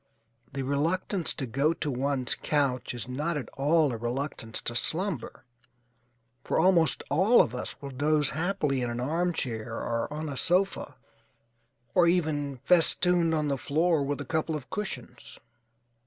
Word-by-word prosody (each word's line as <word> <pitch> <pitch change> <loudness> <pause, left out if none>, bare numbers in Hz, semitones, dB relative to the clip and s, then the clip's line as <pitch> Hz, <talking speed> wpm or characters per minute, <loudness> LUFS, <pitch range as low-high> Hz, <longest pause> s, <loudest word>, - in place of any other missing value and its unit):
The 135 0 -4
reluctance 165 +6 0
to 135 - -3
go 140 +7 +1
to 155 -3 -3
one's 130 0 0
couch 130 -4 -1
is 120 - -5
not 150 +6 -2
at 130 -6 -6
all 150 +1 +2
a 115 - -4
reluctance 120 -1 -3
to 120 - -4
slumber, 165 - -1 1.0
for - - -1
almost 165 -4 +3
all 190 +11 +4
of 115 - +3
us 125 - -4
will 140 - -6
doze 150 +2 +2
happily 155 -5 -1
in 120 - -2
an 120 0 -4
armchair 130 -6 -2
or 115 +4 -3
on 155 +1 -4
a 140 -2 -5
sofa, 185 +6 +1 1.0
or 175 -1 +4
even 150 -5 0
festooned 175 -1 +4
on 150 -1 0
the 140 -2 -1
floor 160 +3 +1
with 140 0 -3
a 145 - -5
couple 160 +2 -1
of 145 -3 -8
cushions. 210 -2 -6
145 Hz, 155 wpm, -28 LUFS, 130-165 Hz, 1.0 s, all